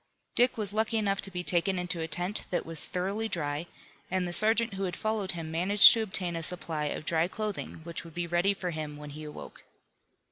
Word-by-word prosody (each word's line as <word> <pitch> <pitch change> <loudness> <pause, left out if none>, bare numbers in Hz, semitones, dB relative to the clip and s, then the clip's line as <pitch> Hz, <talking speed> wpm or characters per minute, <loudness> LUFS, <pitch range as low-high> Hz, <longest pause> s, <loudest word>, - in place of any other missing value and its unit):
Dick 245 0 +2
was 205 -2 -3
lucky 220 +1 0
enough 200 -2 0
to 195 - +2
be 180 -1 -5
taken 180 +2 +2
into 180 -1 -2
a 160 - -3
tent 175 +6 -2
that 180 - -2
was 165 -1 -1
thoroughly 200 +5 -3
dry, 150 -2 -3 0.4
and 185 -1 -1
the 175 - -5
sergeant 225 +3 +5
who 195 0 -3
had 180 -2 -4
followed 215 -4 -2
him 165 -2 -6
managed 190 +5 +7
to 230 - 0
obtain 185 -5 -2
a 165 - -3
supply 165 -2 0
of 150 - -4
dry 165 0 +1
clothing 210 -4 -5
which 170 0 -6
would 165 -2 -14
be 175 0 -2
ready 175 +4 +1
for 180 -2 -4
him 155 -2 -6
when 150 0 -9
he 155 +2 -9
awoke. 150 -1 -10
180 Hz, 220 wpm, -29 LUFS, 165-200 Hz, 0.4 s, managed